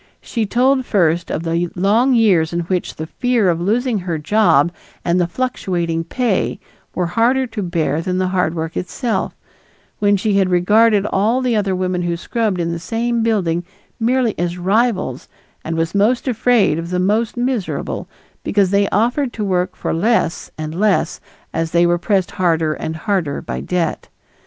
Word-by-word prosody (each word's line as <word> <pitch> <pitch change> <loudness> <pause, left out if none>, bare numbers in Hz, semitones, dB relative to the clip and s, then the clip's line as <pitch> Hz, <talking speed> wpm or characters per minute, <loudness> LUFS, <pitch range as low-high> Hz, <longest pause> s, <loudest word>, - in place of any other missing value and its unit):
She 225 -4 -3
told 260 +4 +2
first 175 -7 +1
of 160 - -2
the 170 +1 -1
long 225 +8 +3
years 185 -9 +3
in 170 0 -1
which 180 +1 -2
the 155 - -5
fear 240 +2 +1
of 170 0 -3
losing 225 +4 +1
her 175 -3 -3
job 170 -2 +3 0.3
and 175 +1 +2
the 175 - +1
fluctuating 175 -7 -2
pay 235 +1 -1 0.4
were 180 - 0
harder 235 +9 +2
to 230 -3 -5
bear 165 -4 -1
than 180 +2 -2
the 185 0 0
hard 180 -3 0
work 160 0 -4
itself, 225 +5 -2 0.6
when 205 -1 +3
she 200 0 +1
had 190 -1 +2
regarded 205 +4 +4
all 215 +5 +1
the 250 -3 0
other 200 -3 0
women 180 -1 -1
who 170 -1 -1
scrubbed 215 0 -1
in 170 0 -1
the 170 - -3
same 230 +5 -1
building 185 -7 0 0.4
merely 240 -1 +1
as 175 0 -1
rivals 190 - 0 0.4
and 165 +1 -3
was 165 0 -1
most 220 +6 +2
afraid 225 -9 +2
of 165 +1 -5
the 180 - -1
most 210 +6 0
miserable, 245 -5 -2 0.4
because 200 -3 +2
they 200 0 +2
offered 245 +5 +1
to 215 - -3
work 185 -1 0
for - - -3
less 200 0 0
and 155 0 -5
less 195 -2 +1 0.3
as 165 0 -1
they 170 +1 +3
were 175 0 +2
pressed 190 -1 0
harder 165 -5 +1
and 160 +1 -5
harder 175 -6 -1
by - - -5
debt. 180 -2 -2
190 Hz, 175 wpm, -18 LUFS, 170-225 Hz, 0.6 s, regarded